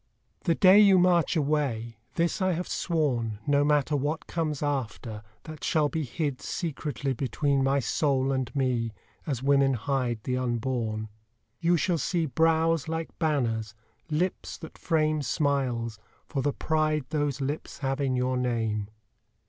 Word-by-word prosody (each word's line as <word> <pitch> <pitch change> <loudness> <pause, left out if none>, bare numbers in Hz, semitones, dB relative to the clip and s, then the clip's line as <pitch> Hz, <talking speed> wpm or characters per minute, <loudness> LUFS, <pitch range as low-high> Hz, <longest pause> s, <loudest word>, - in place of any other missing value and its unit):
The 170 -3 +3
day 190 +2 +7
you 200 -2 +7
march 180 -1 +3
away 140 -7 0 0.2
this 170 +4 0
I 185 -1 +2
have 175 +2 -3
sworn, 125 - 0
No 145 0 +3
matter 150 0 +2
what 145 +3 -1
comes 155 -4 -2
after, 120 -6 -3 0.2
that 155 -2 -9
shall 155 -3 +2
be 160 +1 -2
Hid 140 0 -3
secretly 145 - -3
between 135 +2 0
my 135 +1 +2
soul 135 0 +1
and 130 -2 -1
me 125 -5 0 0.3
As 135 -4 -2
women 135 -1 +4
hide 125 0 -1
the 125 0 -1
unborn 120 -3 -2 0.5
You 170 +1 +3
shall 175 0 +1
see 170 0 0
brows 160 +2 +2
like 165 0 -3
banners, 115 -9 0 0.3
lips 170 +4 -1
that 160 - -10
frame 155 -2 +1
Smiles, 125 -5 -1 0.3
for 140 - -2
the 145 - +1
pride 155 -1 0
those 145 -3 -1
lips 140 +3 -4
have 135 +1 -1
in 135 -2 +1
your 125 0 0
name. 115 -4 -1
140 Hz, 150 wpm, -27 LUFS, 125-160 Hz, 0.5 s, day